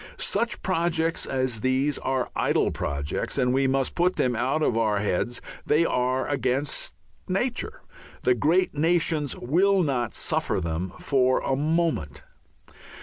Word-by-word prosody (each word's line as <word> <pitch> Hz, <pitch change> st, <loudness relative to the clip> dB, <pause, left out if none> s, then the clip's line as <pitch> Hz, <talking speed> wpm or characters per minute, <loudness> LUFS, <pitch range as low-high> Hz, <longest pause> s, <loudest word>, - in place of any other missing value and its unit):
Such 235 Hz, 0 st, -1 dB
projects 165 Hz, -2 st, 0 dB
as 130 Hz, -4 st, -1 dB
these 130 Hz, +3 st, +1 dB
are 130 Hz, -1 st, -1 dB
idle -, -, +2 dB
projects 70 Hz, -, -3 dB
and 125 Hz, -2 st, +2 dB
we 135 Hz, 0 st, +2 dB
must 135 Hz, 0 st, 0 dB
put 180 Hz, +1 st, +2 dB
them 125 Hz, -1 st, +1 dB
out 130 Hz, +7 st, 0 dB
of 120 Hz, -, +2 dB
our 110 Hz, -2 st, +2 dB
heads; 105 Hz, +4 st, -1 dB, 0.2 s
they 155 Hz, +3 st, +3 dB
are 130 Hz, -2 st, 0 dB
against 135 Hz, 0 st, -1 dB, 0.3 s
nature; -, -, -2 dB, 0.4 s
the 125 Hz, -, +4 dB
great 160 Hz, +10 st, +2 dB
nations 160 Hz, -2 st, +1 dB
will 185 Hz, +8 st, +2 dB
not 125 Hz, -6 st, -1 dB
suffer -, -, 0 dB
them 85 Hz, +1 st, -3 dB
for 130 Hz, -2 st, +2 dB
a 135 Hz, -, 0 dB
moment. 155 Hz, -, -1 dB
135 Hz, 140 wpm, -25 LUFS, 125-160 Hz, 0.4 s, the